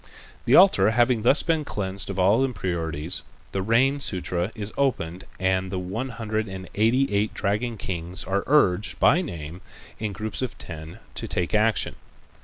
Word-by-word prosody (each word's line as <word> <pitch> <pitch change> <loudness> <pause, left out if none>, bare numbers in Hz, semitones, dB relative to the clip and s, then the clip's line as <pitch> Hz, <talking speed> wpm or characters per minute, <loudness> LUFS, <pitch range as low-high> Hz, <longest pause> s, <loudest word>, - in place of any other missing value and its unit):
The 125 - +5
altar 110 - +7
having 120 0 +3
thus 130 +6 +4
been 160 -2 +1
cleansed 100 -7 -3
of 100 - -4
all 100 +7 +4
impurities, 85 - -1 0.3
the 95 - -1
rain 125 +7 +3
sutra 90 -6 -2
is 105 -1 -5
opened 95 -10 -1
and 95 0 +1
the 95 - -2
one 95 +8 -3
hundred 110 -2 -3
and 95 0 -7
eighty 115 +3 +2
eight 105 +1 0
dragon 105 +3 -1
kings 90 -2 -4
are 100 +1 -1
urged 105 -9 +3
by 175 - +5
name 85 - -7 0.4
in 105 -1 -2
groups 110 +4 -5
of 130 - -3
ten 80 -1 -8 0.2
to - - -4
take 90 -2 -2
action. 110 +1 +2
100 Hz, 165 wpm, -25 LUFS, 90-120 Hz, 0.4 s, altar